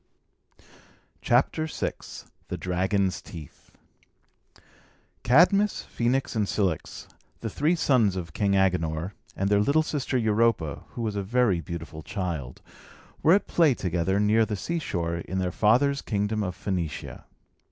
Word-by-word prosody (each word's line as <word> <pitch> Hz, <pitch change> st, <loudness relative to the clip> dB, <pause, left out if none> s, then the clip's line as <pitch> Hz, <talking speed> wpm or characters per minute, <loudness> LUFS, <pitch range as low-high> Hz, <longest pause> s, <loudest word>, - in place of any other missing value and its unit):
CHAPTER 140 Hz, +6 st, +2 dB
VI -, -, -2 dB, 0.6 s
THE -, -, -4 dB
DRAGON'S 95 Hz, +1 st, 0 dB
TEETH 80 Hz, -5 st, -12 dB, 1.5 s
Cadmus, 190 Hz, -, +4 dB
Phœnix, 125 Hz, +2 st, 0 dB
and 105 Hz, -2 st, +1 dB
Cilix, 95 Hz, -8 st, -2 dB, 0.3 s
the 115 Hz, -, -4 dB
three 155 Hz, -, +1 dB
sons 120 Hz, -, +2 dB
of 85 Hz, -4 st, -5 dB
King 100 Hz, -2 st, +1 dB
Agenor, 90 Hz, -3 st, +1 dB, 0.2 s
and 95 Hz, -, -1 dB
their 100 Hz, 0 st, +3 dB
little 140 Hz, +9 st, +3 dB
sister 145 Hz, -4 st, -2 dB
Europa 110 Hz, -, +1 dB
(who 120 Hz, -, -4 dB
was 110 Hz, -2 st, -2 dB
a 100 Hz, -, -1 dB
very 105 Hz, -3 st, +1 dB
beautiful 80 Hz, -1 st, -7 dB
child) 80 Hz, -, -5 dB, 0.6 s
were 160 Hz, -, +5 dB
at 205 Hz, -, 0 dB
play 160 Hz, -7 st, +3 dB
together, 90 Hz, 0 st, 0 dB
near 105 Hz, +2 st, +4 dB
the 105 Hz, -1 st, -2 dB
seashore, 95 Hz, -, -2 dB
in 90 Hz, +2 st, -5 dB
their 90 Hz, -1 st, 0 dB
father's 135 Hz, +8 st, +3 dB
kingdom 105 Hz, 0 st, -1 dB
of 90 Hz, -2 st, -3 dB
Phœnicia. 90 Hz, -6 st, -4 dB
100 Hz, 130 wpm, -26 LUFS, 90-125 Hz, 1.5 s, were